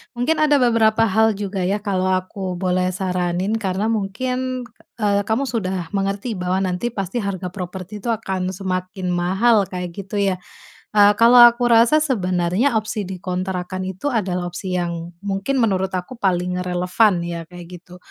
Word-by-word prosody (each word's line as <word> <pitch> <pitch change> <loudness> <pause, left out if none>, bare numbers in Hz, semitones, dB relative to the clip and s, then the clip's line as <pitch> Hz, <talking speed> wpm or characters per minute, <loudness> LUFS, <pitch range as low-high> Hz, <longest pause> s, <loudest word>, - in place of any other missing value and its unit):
mungkin 250 +7 0
ada 300 -1 +4
beberapa 230 -4 +3
hal 220 +1 +3
juga 200 -1 -4
ya, 195 - +1
kalau 190 -3 0
aku 185 0 -2
boleh 180 0 0
saranin 180 0 -1
karena 200 +2 -1
mungkin, 250 +5 -2 0.3
eee, 205 -2 0
kamu 225 +5 +1
sudah 190 -9 -3
mengerti 200 +2 -2
bahwa 180 +1 0
nanti 185 +4 -1
pasti 200 -1 -3
harga 190 -4 -4
properti 185 +2 -7
itu 225 - -8
akan 190 -3 -3
semakin 185 0 -3
mahal, 195 +4 +2
kayak 180 -1 -5
gitu 195 +3 -8
ya. 190 -2 0 0.6
Eee, 205 -1 +7
kalau 240 +1 +8
aku 240 +1 -1
rasa 235 +5 +5
sebenarnya 200 - +1
opsi 215 0 -3
dikontrakkan 185 0 -4
itu 190 +6 -5
adalah 190 -9 -1
opsi 180 +1 -3
yang 170 -1 -3
mungkin 200 +7 -2
menurut 190 -5 +1
aku 180 +8 -7
paling 180 -5 0
relevan 180 +4 +2
ya, 170 -1 -5
kayak 175 0 -10
gitu. 180 0 -15
190 Hz, 155 wpm, -21 LUFS, 180-220 Hz, 0.6 s, kalau